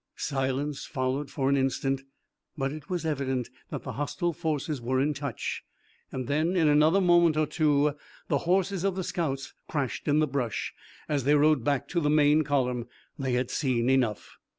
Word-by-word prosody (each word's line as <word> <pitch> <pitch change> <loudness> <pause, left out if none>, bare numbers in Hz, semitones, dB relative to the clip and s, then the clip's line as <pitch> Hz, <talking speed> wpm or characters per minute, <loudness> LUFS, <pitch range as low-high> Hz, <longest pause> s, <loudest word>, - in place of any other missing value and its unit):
Silence 135 +1 -2
followed 130 +1 -2
for 135 -2 -1
an 140 - +4
instant, 135 0 0 0.6
but 135 -1 -1
it 150 -1 -9
was 175 -3 -2
evident 130 -5 -1 0.2
that - - -5
the - - -5
hostile 170 +4 -2
forces 150 -3 -2
were 130 +2 0
in 145 +3 +2
touch 140 0 -4 0.5
and 130 -1 -4
then 155 +5 +1
in 165 -4 +4
another 155 +5 +5
moment 175 -3 +4
or 155 - +3
two 150 -2 +2 0.3
the 140 - +1
horses 190 0 +2
of 195 -2 +1
the 190 - -2
scouts 140 -7 -3 0.2
crashed 140 -5 -2
in 145 0 +3
the 155 - +4
brush, 130 -5 -2 0.3
as 145 -3 0
they 145 +3 +4
rode 150 -3 +4
back 140 -2 0
to 175 - 0
the 150 -3 +1
main 150 +1 +4
column. 125 -4 0 0.3
They 130 -2 -1
had 125 0 0
seen 125 -2 +1
enough. 125 -6 0
145 Hz, 180 wpm, -28 LUFS, 135-155 Hz, 0.6 s, another